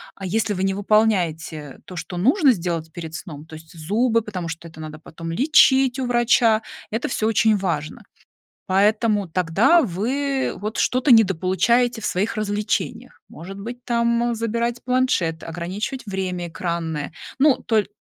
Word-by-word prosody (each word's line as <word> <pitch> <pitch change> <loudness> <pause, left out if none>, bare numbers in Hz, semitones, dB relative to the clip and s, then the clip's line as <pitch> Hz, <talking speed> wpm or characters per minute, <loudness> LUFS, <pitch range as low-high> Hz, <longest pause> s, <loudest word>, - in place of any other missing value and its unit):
а 195 - -8
если 215 +3 0
вы 185 -1 -2
не 195 0 +1
выполняете 180 -8 0
то, 185 - -10
что 180 - -6
нужно 270 - +4
сделать 170 -4 -4
перед 160 -2 -7
сном, 155 -4 -8
то 160 - -11
есть 160 +1 -14
зубы, 225 +8 +1
потому 190 -6 -5
что 165 0 -7
это 160 -1 -14
надо 155 -1 -7
потом 165 +1 -9
лечить 265 - +4
у 260 - -1
врача, 240 -2 +3 0.3
это 225 +3 -2
всё 220 -3 0
очень 220 -1 +3
важно. 170 -6 -3 0.6
Поэтому 205 +1 +2
тогда 185 - +3
вы 265 - -1
вот 215 +2 -5
что-то 255 +2 +2
недополучаете 225 +3 +3
в - - -4
своих 210 +4 -1
развлечениях. 215 +3 -2
Может 190 +5 -9
быть, 240 +4 -8
там, 235 0 +1
э, - - -2
забирать 235 +1 -2
планшет, 250 -11 0
ограничивать 185 - -5
время 185 -3 -3
экранное. 165 -3 -4 0.3
Ну, 285 -1 +5
толь 215 -3 +1
205 Hz, 155 wpm, -22 LUFS, 170-235 Hz, 0.6 s, Ну